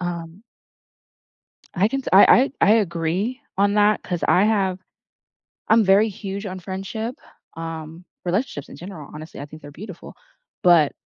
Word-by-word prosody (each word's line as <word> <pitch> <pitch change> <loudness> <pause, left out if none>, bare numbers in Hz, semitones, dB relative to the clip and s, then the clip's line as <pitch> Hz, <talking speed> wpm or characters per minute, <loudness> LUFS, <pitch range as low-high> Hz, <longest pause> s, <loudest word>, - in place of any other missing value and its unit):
Um 175 +2 -6 1.3
I 195 +4 +2
can 270 +2 -2
sa - - -5
I 200 +6 +8
I 275 - -2
I 205 - +5
agree 190 +5 -1 0.2
on 200 +1 +3
that 210 0 +3
'cause 175 -2 -4
I 190 - +4
have 195 -4 +1 0.9
I'm 220 -1 +5
very 200 +3 +5
huge 200 +1 -6
on 185 0 -5
friendship, 195 +6 -5 0.4
um, 165 +1 -7 0.2
relationships 180 - -2
in - - -11
general, 175 -5 -9
honestly, 155 +1 -9
I - - -5
think 155 +1 -13
they're 145 - -10
beautiful. 185 +3 -10 0.5
But, 170 -5 +5
190 Hz, 150 wpm, -22 LUFS, 165-210 Hz, 1.3 s, I